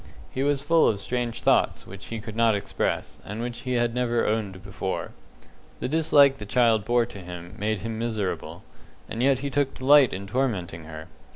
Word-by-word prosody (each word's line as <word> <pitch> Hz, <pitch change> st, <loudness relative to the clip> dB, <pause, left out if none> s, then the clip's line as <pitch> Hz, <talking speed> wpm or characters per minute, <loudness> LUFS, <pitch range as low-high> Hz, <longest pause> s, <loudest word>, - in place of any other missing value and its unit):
He 130 Hz, -, -2 dB
was 140 Hz, 0 st, +1 dB
full 165 Hz, +2 st, +4 dB
of 105 Hz, -, +1 dB
strange 120 Hz, +2 st, -3 dB
thoughts, -, -, +2 dB
which 100 Hz, +1 st, -11 dB
he 115 Hz, -, -5 dB
could 110 Hz, 0 st, -8 dB
not 115 Hz, -2 st, +3 dB
express, 100 Hz, 0 st, -2 dB
and 105 Hz, +2 st, -6 dB
which 120 Hz, 0 st, -4 dB
he 125 Hz, -, -3 dB
had 120 Hz, -1 st, +1 dB
never 120 Hz, -1 st, +1 dB
owned 100 Hz, -4 st, -2 dB
before. 95 Hz, -1 st, -4 dB, 0.7 s
The -, -, -2 dB
dislike 145 Hz, -2 st, +4 dB
the 105 Hz, -, -6 dB
child 115 Hz, -2 st, +3 dB
bore 120 Hz, -1 st, +3 dB
to 110 Hz, -4 st, -10 dB
him 90 Hz, -1 st, -9 dB
made 105 Hz, -1 st, -1 dB
him 110 Hz, 0 st, -4 dB
miserable, 110 Hz, -5 st, -3 dB, 0.4 s
and 115 Hz, -, -4 dB
yet 135 Hz, 0 st, +3 dB
he 140 Hz, -, -2 dB
took 140 Hz, -1 st, 0 dB
delight 140 Hz, -1 st, +6 dB
in 95 Hz, +1 st, -5 dB
tormenting 100 Hz, -8 st, -2 dB
her. 80 Hz, 0 st, -9 dB
115 Hz, 190 wpm, -25 LUFS, 100-130 Hz, 0.7 s, delight